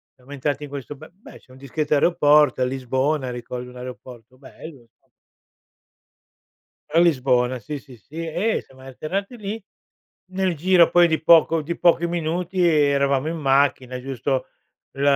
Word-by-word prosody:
siamo 130 +3 -18
entrati 145 +1 -3
in - - -12
questo 140 +1 -7
be 155 +4 -13
beh, 195 +5 -15
c'è 130 - -23
un 130 - -15
discreto 145 +3 -2
aeroporto, 150 -4 +3
a 125 - +3
Lisbona, 130 +2 -1
ricordo 125 +1 -7
un - - -16
aeroporto 125 -1 -11
bello, 140 0 -12
insom 115 - -31 1.8
A 165 - +3
Lisbona, 130 -6 +2
sì, 145 +3 -6
sì, 130 -4 -16
sì. 155 +10 -8
Eh, 175 +8 -1
siamo 130 0 -20
atterrati 170 - -5
lì, 215 0 -6 0.7
nel 185 -2 -1
giro, 175 +2 +4
poi, 175 0 +5
di 160 -1 -1
poco 165 0 +5
di 170 +3 -5
pochi 170 0 +3
minuti 175 +2 -1
eravamo 140 -3 +2
in 165 - -4
macchina, 135 -3 +1
giusto 135 0 -2 0.5
l 135 - -7
145 Hz, 155 wpm, -22 LUFS, 130-170 Hz, 1.8 s, poi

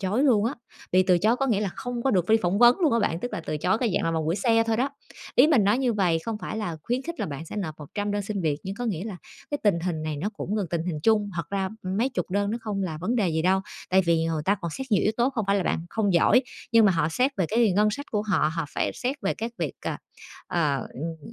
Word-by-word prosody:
chối 200 +7 0
luôn 225 -7 +4
á, 240 +5 0 0.4
bị 185 - +5
từ 180 -1 +3
chối 220 +6 +3
có 270 +2 0
nghĩa 220 -6 +1
là 205 - 0
không 245 -1 -4
có 270 - +2
được 185 -4 +1
đi 220 - +6
phỏng 180 +3 +1
vấn 240 - +6
luôn 315 -8 +3
á 230 - +3
bạn, 170 -5 0
tức 245 - -4
là - - -3
từ 155 - -1
chối 220 +9 +1
cái 235 -5 0
dạng - - +1
là 165 - +1
vòng 160 -1 -1
gửi 165 - +1
xe 225 +2 +3
thôi 225 -1 +1
đó. 270 +3 0 0.4
Ý 255 - +7
mình 275 -10 +4
nói 210 +5 +3
như 250 -3 +1
vầy 180 -6 +2
không 225 -2 -3
phải 215 - -5
là 175 -7 -3
khuyến 245 +7 -1
khích 335 +3 -6
là - - -1
bạn 145 +1 -6
sẽ 210 - -8
nộp 175 -7 -3
100 205 +8 -4
đơn 205 0 -1
xin 200 0 -3
việc, 150 -3 +1
nhưng 190 +1 -5
có 245 +3 -5
nghĩa 190 -4 -2
là 210 -5 -5 0.3
cái 290 - -1
tình 200 -6 +3
hình 165 -3 -2
này 155 -1 -3
nó 180 +9 -2
cũng 210 - -3
gần 205 -3 -1
tình 170 -2 -1
hình 160 -4 -3
chung. 210 -1 +3
Thật 170 -2 -4
ra 195 -1 -1
mấy 195 +7 0
chục 250 -7 -4
đơn 200 +1 0
nó 230 - -2
không 210 -3 -3
là 165 -5 -3
vấn 215 +9 -1
đề 205 -6 +2
gì 160 -1 0
đâu, 190 +2 +3 0.3
tại 190 +1 +5
vì, 165 -2 +2
ờ, 155 -2 -2
ta 200 +4 +3
còn 170 - -3
xét 265 +11 -5
nhiều 195 - +4
yếu 215 - +2
tố 245 +2 +2
không 230 -5 -2
phải 200 +1 +3
là 190 - +1
bạn 165 - -1
không 205 -4 +1
giỏi, 210 +9 +5 0.3
nhưng 230 -1 +6
mà 195 - +5
họ 165 -2 +1
xét 250 - +1
về 185 -4 +1
cái 225 -2 +3
ngân 210 +3 +3
sách 285 +6 -5
của 210 -1 0
họ, 180 -7 +1
họ 165 - -1
phải - - 0
xét 260 +2 -2
về 195 - 0
các 230 +2 -5
việc, - - -2
à, - - -3 0.5
ờ, 150 -5 +1 0.2
ừm, 165 - -6
200 Hz, 305 wpm, -26 LUFS, 170-230 Hz, 0.5 s, Ý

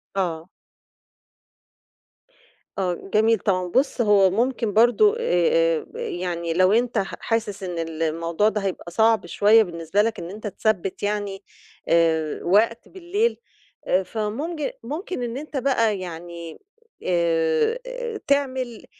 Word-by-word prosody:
آه. 170 -3 -2 2.3
آه 185 -1 -2
جميل 220 +1 +4
طبعًا. 185 -2 0
بُص 260 +7 +1
هو 205 -3 +5
ممكن 230 +1 0
برضو 245 - +5
آآ 165 - +2
يعني 170 -2 -3
لو 185 +3 +4
أنت 240 +1 +1
ح 195 - -1
حاسس 220 -4 -2
إن 175 -2 -4 0.2
الموضوع 165 +5 +1
ده 215 -1 -3
هيبقى 185 -3 -4
صعب 220 +2 +3
شوية 210 +5 +5
بالنسبة 170 +1 -1
لك 225 +1 -1
إن 170 - -6
أنت 210 +3 -7
تثبّت 205 -2 -1
يعني 205 -1 -2 0.4
آآ 160 -2 +2
وقت 225 +6 +2
بالليل، 390 +6 -1 0.5
آآ 185 +1 +2
فمُمج 235 - -3
ممكن 310 - -4
إن 240 +1 -4
أنت 295 0 -6
بقى 230 -6 +1
يعني 170 -2 -8 0.4
آآ 185 - 0
تعمل 260 -4 -1
205 Hz, 120 wpm, -23 LUFS, 175-240 Hz, 2.3 s, هو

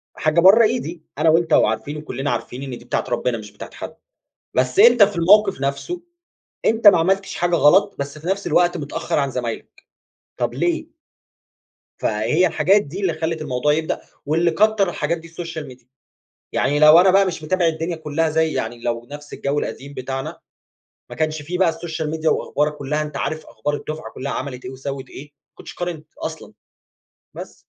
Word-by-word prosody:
حاجة 155 +2 +1
برّه 195 +7 +7
إيدي، 215 -8 -1 0.2
أنا 160 +1 +3
وأنت 165 +1 +3
وعارفين 140 +7 +2
وكلّنا 145 -2 -4
عارفين 125 +2 -4
إن 130 -3 -6
دي 120 - -16
بتاعة - - -1
ربنا 120 0 -1
مش 105 -2 -10
بتاعة 105 - -10
حد. - - -8 0.6
بس 130 +3 0
أنت 235 +2 +7
في 200 -1 +4
الموقف 195 -1 +4
نفسه، 140 - -3 0.6
أنت 225 -1 +1
ما 185 -4 +9
عملتش 195 +4 0
حاجة 175 0 +1
غلط 160 +6 +4
بس 140 +2 -5
في 155 - -11
نفس 195 +2 -1
الوقت 175 0 +3
متأخر 145 0 -3
عن 140 -1 0
زمايلك، 120 -3 -6 0.5
طب - - -2
ليه؟ - - -1 1.1
فهي 115 +12 +1
الحاجات 195 +5 +3
دي 165 +8 -7
اللي 185 -4 +1
خلّت 160 0 -3
الموضوع 150 0 0
يبدأ، 160 +1 -2 0.2
واللي 165 +4 +2
كتر 215 -1 +2
الحاجات 170 0 -2
دي 165 - -12
السوشيال 165 -2 -7
ميديا 125 -1 -14 0.7
يعني 145 +1 +1
لو 155 +2 +8
أنا 185 +1 +5
بقى 195 +1 +4
مش 170 -4 -4
متابع 180 +2 +1
الدنيا 165 +1 -1
كلها 160 +1 -1
زي 160 0 +1
يعني 120 +1 -3
لو 120 0 -3
نفس 145 0 -10
الجو 140 +1 -2
القديم 140 0 -5
بتاعنا 135 +1 -5 0.7
ما - - -8
كانش 155 -1 -1
في 180 +4 -4
بقى 185 -3 +4
السوشيال 160 -1 -4
ميديا 160 0 0
وأخبارك 150 +1 0
كلها 150 +2 -2
أنت 150 -2 -6
عارف 155 +2 -3
أخبار 145 - -3
الدفعة 155 +2 -6
كلها 140 +2 -4
عملت 130 -2 -5
إيه 125 - -5
وسوِّت 135 0 -6
إيه، 140 - -9
ما 145 -1 -50
كنتش - - -11
قارنت 170 -4 -5
أصلًا، - - -7 0.8
بس. - - -9
155 Hz, 180 wpm, -21 LUFS, 140-175 Hz, 1.1 s, ما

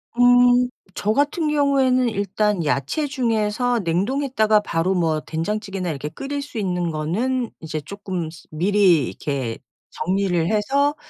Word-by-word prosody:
음 245 0 +5 0.3
저 210 +1 0
같은 290 +4 +1
경우에는 270 -4 +3
일단 205 -3 0
야채 145 - 0
중에서 240 -2 0
냉동했다가 215 - +1
바로 185 -1 0
뭐 160 -3 +1
된장찌개나 190 +4 -3
이렇게 150 0 -5
끓일 285 - -5
수 280 -4 -9
있는 180 -4 -1
거는 220 +11 -1
이제 155 -1 -4
쪼끔 185 -3 -5
스 165 - -15
미리 175 -3 +3
이렇게 130 -6 -4 0.3
정리를 180 -2 0
해서 280 +8 +1
210 Hz, 285 characters per minute, -22 LUFS, 170-250 Hz, 0.3 s, 음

